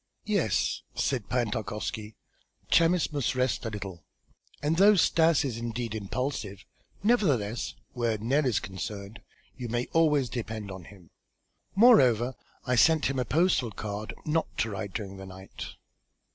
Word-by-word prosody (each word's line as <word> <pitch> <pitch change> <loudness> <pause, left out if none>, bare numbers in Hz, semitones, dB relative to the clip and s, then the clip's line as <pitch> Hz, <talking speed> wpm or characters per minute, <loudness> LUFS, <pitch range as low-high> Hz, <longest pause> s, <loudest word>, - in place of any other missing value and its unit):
"Yes," 200 - +1
said 125 -7 -1
Pan 120 -2 0
Tarkowski, 105 0 -4 0.6
"Chamis 165 -1 +3
must 140 -3 0
rest 130 -1 0
a - - -1
little, 95 -6 -7 0.6
and 155 +3 +1
though 205 +3 +7
Stas 165 -4 +4
is 120 -4 -3
indeed 120 -1 -3
impulsive, 105 -1 -4 0.4
nevertheless, 140 - +1 0.2
where 120 -3 0
Nell 135 +7 +1
is 120 - +2
concerned 100 +3 -6 0.3
you 125 -2 -6
may 120 +2 -1
always 150 -5 +3
depend 110 -4 -5
upon 95 -2 -8
him. 95 -4 -16 0.6
Moreover, 130 - +6 0.3
I 125 -1 +1
sent 155 +2 +4
him 135 - -2
a 125 - 0
postal 155 -3 +2
card 105 +1 -5
not 160 +1 +1
to 110 - 0
ride 100 -1 -5
during 100 -3 -5
the 95 0 -9
night." 95 0 -9
120 Hz, 145 wpm, -28 LUFS, 105-145 Hz, 0.6 s, though